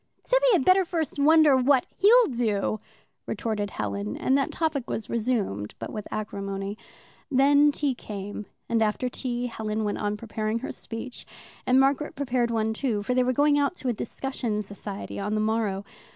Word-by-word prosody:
"Tibby - - +3
had 340 -9 +3
better 375 +1 +6
first 330 -4 -3
wonder 305 -1 +6
what 260 0 +3
he'll 460 +5 +6
do," 220 - -1 0.5
retorted 210 -1 -2
Helen; 100 - -3
and 265 - +2
that 275 -1 +1
topic 310 -6 -1
was 220 - -4
resumed, 215 - -1
but - - -6
with 210 - -6
acrimony. 200 -1 -4 0.5
Then 285 +2 +5
tea 285 -1 0
came, 205 -2 -7 0.2
and 230 -1 +1
after 220 +4 +1
tea 245 -1 -3
Helen 220 -2 -3
went 205 -1 -2
on 210 0 -1
preparing 215 0 -2
her 245 - -5
speech, 240 +2 -7 0.4
and 255 +1 +5
Margaret 275 +2 +2
prepared 255 -4 0
one, 220 -1 0
too, 220 -4 -1
for 250 - 0
they 255 - +3
were 250 0 +2
going 290 +3 +3
out 285 +5 +1
to 265 - -3
a - - +1
discussion 230 -2 -3
society 200 0 -7
on 210 +2 -1
the - - +1
morrow. 215 -2 0
235 Hz, 175 wpm, -26 LUFS, 210-275 Hz, 0.5 s, better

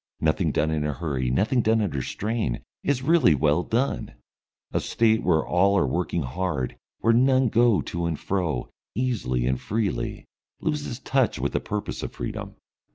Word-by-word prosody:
Nothing 75 -1 +1
done 80 +1 +1
in 75 -1 0
a 75 0 -1
hurry, 65 -4 -2
nothing 110 - +2
done 110 0 +3
under 80 -11 -1
strain, 105 - -2 0.2
is 130 -3 0
really 145 - +5
well 75 +4 +2
done. 115 - -1 0.6
A - - +1
State 110 -1 +2
where 80 -4 +2
all 100 +3 +3
are 90 - +3
working 85 +3 -1
hard, 70 -2 -2 0.3
where 115 - +4
none 130 +1 +4
go 115 -2 +4
to 85 0 -3
and 80 -3 -2
fro, 85 -10 -2 0.2
easily 95 - 0
and 65 0 0
freely, 105 -1 -2 0.3
loses 150 -6 -2
touch 135 -2 +1
with - - -2
the - - +1
purpose 105 0 -4
of - - -5
freedom. - - -5
95 Hz, 165 wpm, -25 LUFS, 75-115 Hz, 0.6 s, really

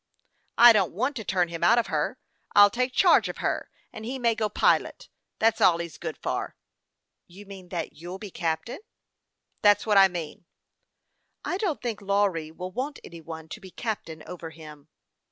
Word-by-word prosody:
" - - -45
I 235 - +10
don't 200 -5 +1
want 255 - -1
to 220 - -5
turn 180 -3 0
him 170 -1 -6
out 235 - +5
of 235 - +2
her. - - -2 0.4
I'll 205 0 +8
take 250 +3 -1
charge 360 +7 +4
of - - -6
her, - - -2 0.2
and 220 - -8
he 255 +4 -4
may 235 -2 +2
go 220 -2 -1
pilot; - - +1 0.3
that's 225 0 +2
all 170 -2 +5
he's 170 -2 -7
good - - -5
for." - - -4 0.7
."You 195 +4 -13
mean 190 -2 -11
that 170 -3 -4
you'll 175 +5 -8
be 200 -1 -9
captain?" 165 - -3 0.4
" - - -50
That's 205 -1 +4
what 210 -3 +5
I 195 - +8
mean." 170 -3 -7 0.5
" - - -26
I 360 - -1
don't 370 - -2
think 230 -4 -3
Lawry 200 -5 0
will 180 +3 -7
want 270 +7 -4
any 170 -1 -11
one 160 0 -9
to 215 - -8
be 190 - -11
captain 175 -7 -5
over 170 -2 -8
him." 155 -2 -13
195 Hz, 195 wpm, -26 LUFS, 170-225 Hz, 0.7 s, I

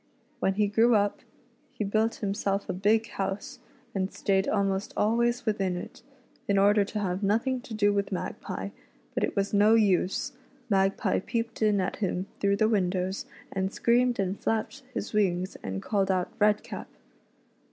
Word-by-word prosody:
When 195 -5 +1
he 210 +1 +3
grew 225 +3 +4
I'.p, 205 -1 +1 0.6
hf; 205 -2 -1
biiik. 220 +2 +1
•vm^clf 200 -1 -1
,a - - -2
big 215 +4 +2
house, 195 +1 -4 0.3
and 190 -1 -1
stayed 195 -1 +1
almost 195 -1 0
al\va\s 235 +2 +2
within 195 -5 0
it, - - -8 0.5
in 200 - +2
order 205 +1 +5
to 205 - -5
have 185 -1 -1
nothing 230 +6 +1
to 245 -3 -9
do 205 -1 +3
with 200 0 -1
Magpie; 185 - -4 0.4
but - - -1
it - - -1
was 200 0 0
no 210 +2 +6
use, 200 +4 +2 0.4
Magpie 195 +1 +2
peeped 230 +3 -3
in 210 -2 +3
at 185 - -1
him 190 -2 -1
through 200 0 +2
the 215 +2 +3
windows, 190 -2 0 0.2
and 190 0 -1
screamed 245 +2 +2
and 195 0 -1
flapped 225 +5 -1
his 255 - -4
wings, 185 -3 +1
and 95 0 -4
called 195 -2 +1
out 185 -2 0
" - - -27
Redcap." 210 0 +1
205 Hz, 165 wpm, -28 LUFS, 195-220 Hz, 0.6 s, no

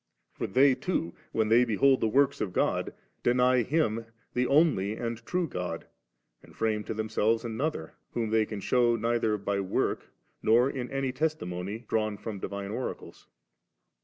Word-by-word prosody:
For - - -3
they 130 +6 +5
too, 125 - -2 0.2
when 110 -1 +1
they 120 +2 +6
behold 130 +4 +3
the - - +3
works 140 +4 +2
of 95 - -2
God, - - 0 0.3
deny 125 +1 +3
Him 115 -4 0 0.3
the 125 0 +1
only 140 - +3
and 115 0 -4
true 180 -1 0
God, 90 - -4 0.6
and - - -18
firame 110 -1 0
to - - -3
themselves 110 +1 0
another, 115 - -3 0.2
whom 115 -2 -1
diey 110 -1 +3
can 105 -2 -5
shew 120 0 +3
neither 115 -1 +1
by 100 0 -2
work, 95 -1 -1 0.3
nor 120 +5 +4
in 125 -2 -4
any 135 -2 -2
testimonv 110 - -3
drawn 110 -2 0
fix>m 105 -2 -6
the - - -2
divine 100 0 -5
oracles. 125 +4 -6
115 Hz, 160 wpm, -29 LUFS, 105-130 Hz, 0.6 s, they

